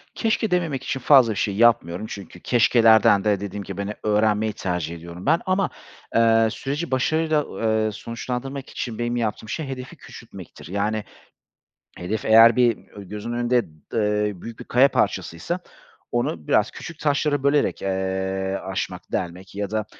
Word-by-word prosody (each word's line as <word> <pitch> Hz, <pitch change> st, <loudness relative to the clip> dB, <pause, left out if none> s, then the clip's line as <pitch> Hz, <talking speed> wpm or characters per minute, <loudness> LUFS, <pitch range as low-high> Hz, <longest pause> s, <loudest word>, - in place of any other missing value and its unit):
Keşke 220 Hz, -2 st, 0 dB
dememek 165 Hz, -7 st, 0 dB
için 135 Hz, -, -3 dB
fazla 130 Hz, -3 st, +6 dB
bir 105 Hz, -, -4 dB
şey 100 Hz, 0 st, -1 dB
yapmıyorum 105 Hz, -5 st, +3 dB
çünkü 95 Hz, -3 st, -9 dB
keşkelerden 110 Hz, -3 st, +4 dB
de 105 Hz, -2 st, +2 dB
dediğim 100 Hz, 0 st, -5 dB
gibi 100 Hz, 0 st, -6 dB
hani 100 Hz, +1 st, -3 dB
öğrenmeyi 105 Hz, 0 st, +2 dB
tercih 90 Hz, -4 st, -3 dB
ediyorum 85 Hz, +2 st, -10 dB
ben 165 Hz, +3 st, +4 dB
ama, 185 Hz, +1 st, +1 dB, 0.5 s
eee, 115 Hz, 0 st, +5 dB
süreci 145 Hz, +7 st, -4 dB
başarıyla, 155 Hz, +3 st, +1 dB, 0.2 s
eee, 110 Hz, -1 st, +1 dB
sonuçlandırmak 125 Hz, +5 st, -5 dB
için 115 Hz, -2 st, -5 dB
benim 120 Hz, 0 st, -1 dB
yaptığım 110 Hz, -2 st, -2 dB
şey 155 Hz, -, -3 dB
hedefi 130 Hz, -1 st, -7 dB
küçültmektir. -, -, -12 dB
Yani 105 Hz, +4 st, -1 dB, 0.9 s
hedef 95 Hz, +5 st, -4 dB
eğer 115 Hz, +1 st, +7 dB
bir 120 Hz, -3 st, +3 dB
ö 100 Hz, -, -11 dB
gözün 105 Hz, +4 st, -6 dB
önünde, 120 Hz, 0 st, +2 dB
d -, -, -19 dB, 0.2 s
eee, 105 Hz, -3 st, 0 dB
büyük 115 Hz, -1 st, -9 dB
bir -, -, -8 dB
kaya 130 Hz, +3 st, +5 dB
parçasıysa 135 Hz, -, -1 dB, 0.5 s
onu 85 Hz, -10 st, -2 dB
biraz -, -, +3 dB
küçük 165 Hz, -2 st, -9 dB
taşlara 145 Hz, -1 st, +1 dB
bölerek, 140 Hz, +1 st, +2 dB
eee, 95 Hz, 0 st, -2 dB
aşmak, 95 Hz, -1 st, -5 dB
delmek 90 Hz, +2 st, -4 dB
ya 100 Hz, 0 st, -3 dB
da 110 Hz, -1 st, -1 dB
110 Hz, 155 wpm, -23 LUFS, 100-125 Hz, 0.9 s, eğer